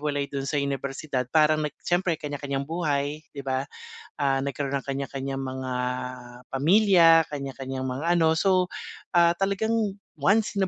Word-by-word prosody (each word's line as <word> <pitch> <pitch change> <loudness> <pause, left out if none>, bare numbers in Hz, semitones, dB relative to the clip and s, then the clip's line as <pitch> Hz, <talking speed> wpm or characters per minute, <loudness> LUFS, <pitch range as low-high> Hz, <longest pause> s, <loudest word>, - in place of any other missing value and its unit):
maghiwalay 145 -1 -2
doon 135 0 -3
sa - - -1
unibersidad, 140 -1 -2
parang 155 +1 +4
nag 150 -1 -3
siyempre 175 -1 +1
kaniya-kaniyang 145 -2 -4
buhay, 150 -3 -1 0.2
'di 140 - -6
ba. 135 0 -2 0.5
Ah, 135 -1 +1
nagkaroon 140 0 -2
ng 135 - -4
kanya-kaniyang 135 0 -4
mga 130 -1 -4 0.8
pamilya. 165 +2 +6
Kaniya-kaniyang 135 -2 -4
mga 130 +5 -4
ano, 160 -2 +3
so, 185 -1 +3 0.5
ah, 170 0 +6
talagang 200 +3 0 0.2
once 200 +5 +2
in 190 - +3
145 Hz, 140 wpm, -26 LUFS, 135-170 Hz, 0.8 s, pamilya